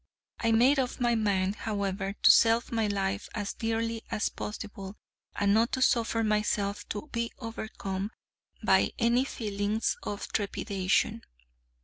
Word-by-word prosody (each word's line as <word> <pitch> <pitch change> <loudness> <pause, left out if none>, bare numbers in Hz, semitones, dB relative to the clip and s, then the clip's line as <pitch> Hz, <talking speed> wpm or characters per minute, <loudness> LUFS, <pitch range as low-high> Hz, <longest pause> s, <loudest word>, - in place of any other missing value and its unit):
I 230 - +1
made 250 +5 +5
up 255 0 -2
my 240 -1 +2
mind, 200 -3 +1
however, 200 -2 -2
to - - +10
sell 230 +1 +5
my 225 -2 +1
life 195 0 -2
as 205 -2 -3
dearly 225 0 -2
as 220 -2 0
possible, 205 -2 -7 0.4
and 200 0 +2
not 225 +3 +3
to 260 - 0
suffer 230 -2 +2
myself 210 -1 0
to 210 +8 -4
be 235 0 -2
overcome 210 -3 -5 0.5
by - - +3
any 240 +2 +3
feelings 210 -2 -1
of 205 - -5
trepidation. 195 - 0
215 Hz, 135 wpm, -29 LUFS, 200-230 Hz, 0.5 s, to